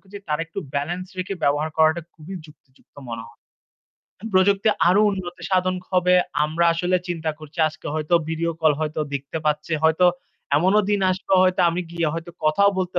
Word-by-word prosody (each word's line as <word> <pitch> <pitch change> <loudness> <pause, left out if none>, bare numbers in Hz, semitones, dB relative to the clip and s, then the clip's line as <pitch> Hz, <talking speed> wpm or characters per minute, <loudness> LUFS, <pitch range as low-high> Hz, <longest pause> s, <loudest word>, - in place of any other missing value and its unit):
করছি, 200 +1 -11
তারা 150 +1 0
একটু 165 - -8 0.2
ব্যালেন্স 175 +6 -2
রেখে 185 +2 -3
ব্যবহার 145 +2 +1
করাটা 160 +1 +3
খুবই 165 +4 -10
যুক্তিযুক্ত 135 -3 -23
মনে 115 -1 -5
হয়। 115 - -18 1.0
প্রযুক্তি 195 +2 +4 0.2
আরও 185 +4 +4
উন্নতি 175 -2 -6
সাধন 185 0 +2 0.2
হবে। 180 0 +3 0.3
আমরা 160 +3 0
আসলে 180 +2 +1
চিন্তা 165 -2 -2
করছি 155 +1 -13
আজকে 155 - -12
হয়তো 155 +2 0
ভিডিও 165 +1 -1
কল 155 -2 +4
হয়তো 155 0 -2
দেখতে 140 +3 -4
পাচ্ছি। 150 +2 -1
হয়তো 160 +3 +4 0.5
এমনও 190 +7 +4
দিন 205 - +2
আসবে 185 +1 -3
হয়তো 185 0 +2
আমি 170 +2 -2
গিয়ে 170 -2 -1
হয়তো 165 +1 -6
কথাও 200 +7 +4
বলতে 180 -1 -1
170 Hz, 170 wpm, -22 LUFS, 155-185 Hz, 1.0 s, প্রযুক্তি